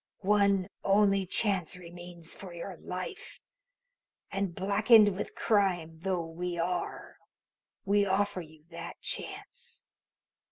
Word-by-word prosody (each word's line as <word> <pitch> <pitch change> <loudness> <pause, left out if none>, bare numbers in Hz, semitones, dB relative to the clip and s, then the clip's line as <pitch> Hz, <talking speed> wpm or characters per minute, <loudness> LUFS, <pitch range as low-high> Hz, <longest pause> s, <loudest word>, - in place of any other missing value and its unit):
One 200 -2 +3 0.2
only 195 -1 +3
chance 190 -3 +1
remains 175 -1 -10
for 185 -3 -10
your 180 +2 -6
life, 185 - -6 0.9
and, 195 -3 -2
blackened 205 +1 +5
with 200 - -5
crime 180 -7 +1
though 180 -1 -1
we 175 +2 -4
are, 175 +1 -3 0.7
we 200 +1 +3
offer 200 0 +1
you 155 -2 -15
that 170 - -7
chance. 480 -1 -6
190 Hz, 110 wpm, -30 LUFS, 175-200 Hz, 0.9 s, blackened